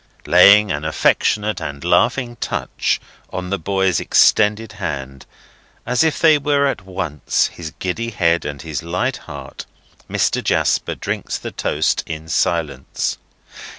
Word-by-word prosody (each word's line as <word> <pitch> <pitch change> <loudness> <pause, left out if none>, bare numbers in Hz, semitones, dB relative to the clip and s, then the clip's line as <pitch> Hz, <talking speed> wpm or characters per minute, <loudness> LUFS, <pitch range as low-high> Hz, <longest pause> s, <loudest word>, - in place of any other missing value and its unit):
Laying 100 +3 +6
an 75 -2 -3
affectionate 105 +6 +1
and 70 -1 -6
laughing 120 -3 +1
touch - - -2 0.3
on 90 0 -5
the 100 - -1
boy's 95 +1 +1
extended 105 0 +3
hand, 70 0 -5 0.6
as 125 +4 +2
if 160 0 0
it 155 -2 +6
were 140 0 +2
at 135 -7 -1
once 80 -7 -1
his 80 -2 -7
giddy 110 +6 -3
head 85 -6 +1
and 70 -1 -6
his 80 -1 -4
light 90 +10 -2
heart, 70 -4 -10 0.4
Mr. - - 0
Jasper - - +1
drinks - - -4
the - - -7
toast 75 +1 0
in 80 0 -6
silence. 75 -8 -1
90 Hz, 135 wpm, -19 LUFS, 80-110 Hz, 0.6 s, Laying